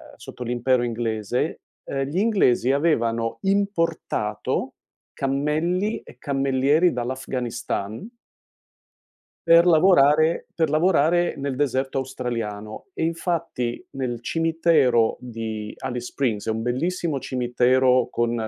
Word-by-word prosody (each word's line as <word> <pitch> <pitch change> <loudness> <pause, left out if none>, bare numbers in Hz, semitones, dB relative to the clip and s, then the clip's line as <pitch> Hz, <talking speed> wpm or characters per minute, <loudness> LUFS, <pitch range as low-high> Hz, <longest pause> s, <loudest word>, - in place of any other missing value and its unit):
sotto 125 - -9
l'impero 120 +1 +1
inglese, 115 -1 -2 0.2
ehm, 135 0 -3
gli 155 +6 -4
inglesi 190 - +3
avevano 115 -7 0
importato 195 -3 -1 0.4
cammelli 155 +9 0
e - - -16
cammellieri 140 +5 +2
dall'Afghanistan 125 - -4 1.4
per 170 +1 +7
lavorare 160 -2 +4
per 160 -3 +1
lavorare 175 +1 +2
nel 140 -1 -3
deserto 135 -1 0
australiano, 115 -5 -5
e - - -2
infatti 165 -7 -2
nel 125 -3 -3
cimitero 160 -8 +2
di 110 -3 -5
Alice 125 -2 -4
Springs, 115 -7 -2
è - - 0
un 110 0 -2
bellissimo 155 +5 -1
cimitero 125 0 +2
con 120 0 0
130 Hz, 100 wpm, -23 LUFS, 120-165 Hz, 1.4 s, per